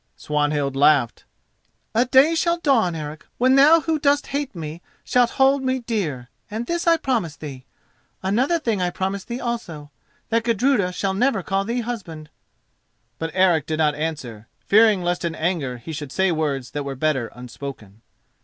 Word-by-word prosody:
Swanhild 145 -2 -1
laughed. 140 -3 +3 0.7
"A 235 +3 +3
day 265 +6 +5
shall 340 +1 +1
dawn, 240 - +2
Eric, 155 0 -6
when 255 +2 +3
thou 300 +5 +6
who 320 0 -1
dost 290 0 +2
hate 280 -4 -4
me 160 0 -7 0.2
shalt 245 -1 +3
hold 270 +1 +4
me 260 0 0
dear, 195 - -3 0.2
and 220 +3 -4
this 340 +5 -2
I 335 0 +5
promise 230 - -1
thee. 135 -5 -9 0.6
Another 245 - +2
thing 225 - -1
I 180 - +1
promise 190 +2 -3
thee 235 +1 -5
also: 170 - -5 0.4
that 230 0 +1
Gudruda 230 -4 +2
shall 190 +1 -2
never 220 -1 +1
call 195 +2 -1
thee 235 +3 -1
husband." 175 -11 -7 0.9
But 165 - -2
Eric 180 -5 +3
did 155 - -2
not 155 -2 +2
answer, 145 -8 -5 0.2
fearing 210 -3 +5
lest 175 +1 -1
in 170 -2 -2
his 155 - -9
anger 155 -8 -1
he 120 +7 -8
should 145 -3 -6
say 190 +5 +1
words 145 -6 -2
that 145 - -3
were 140 -1 -5
better 135 -4 0
unspoken. 125 -4 -9
185 Hz, 175 wpm, -22 LUFS, 150-245 Hz, 0.9 s, thou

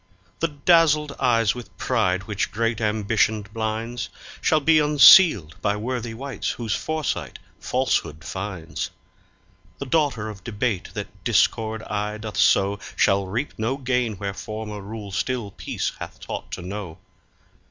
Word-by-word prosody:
The 165 - +2
dazzled 150 -1 +3
eyes 115 -4 +3
with 115 -7 -10
pride, 100 -7 +1
which 100 -1 -2
great 115 +1 -1
ambition 105 0 +1
blinds, 110 +3 -4 0.3
Shall 155 - +3
be 155 +1 +4
unsealed 150 - +7
by 100 - +1
worthy 120 0 -3
wights 135 -1 -4
whose 115 -3 -2
foresight 155 -2 -2 0.2
falsehood 75 +2 -1
finds. 95 -4 -5 0.9
The 140 - -5
daughter 135 -7 +1
of 100 -3 -8
debate 110 -4 -2
that - - -7
discord 110 0 +1
aye 105 0 -3
doth 110 -1 -7
sow 100 +1 +3 0.2
Shall 100 0 +3
reap 115 +10 -3
no 115 +5 0
gain 125 -4 0
where 100 +1 -4
former 105 0 -6
rule 105 0 -7
still 115 +1 -2
peace - - -3
hath - - -8
taught - - -6
to - - -5
know. 95 -3 -6
110 Hz, 140 wpm, -24 LUFS, 100-125 Hz, 0.9 s, unsealed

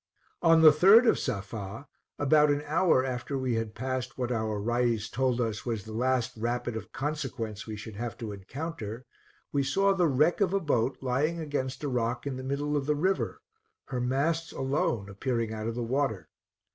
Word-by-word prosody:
On 165 -1 +5
the 155 - +11
3d 195 +11 +7
of - - +4
Safa, 110 +1 -5 0.3
about 150 +1 +4
an 145 0 +1
hour 155 -4 +3
after 130 +2 -3
we 130 -2 -1
had 115 -1 -2
passed 130 -1 -3
what 125 -1 -2
our 110 -3 -1
Rais 120 0 0
told 130 -2 0
us 110 -3 -1
was 115 -5 -3
the 110 - -9
last 125 +1 0
rapid 120 +1 -2
of 110 - -6
consequence 135 -8 -4
we 110 - -5
should 105 0 -8
have 120 +1 -4
to 115 -3 -5
encounter, 115 - -6 0.5
we 140 - +1
saw 195 +9 +2
the 180 -3 +3
wreck 150 +7 +2
of 195 -1 +2
a - - +3
boat 130 -6 0
lying 140 +6 0
against 145 -4 -3
a - - 0
rock 120 -1 -1
in 140 -2 -2
the 130 - -6
middle 145 +2 -1
of 140 -1 -1
the 150 - +2
river, 185 +6 -1 0.5
her 125 -2 -2
masts 155 +6 0
alone 130 -6 -1
appearing 115 +2 -2
out 110 0 -4
of 115 - -3
the 120 - -2
water. 115 - -1
130 Hz, 190 wpm, -29 LUFS, 115-145 Hz, 0.5 s, the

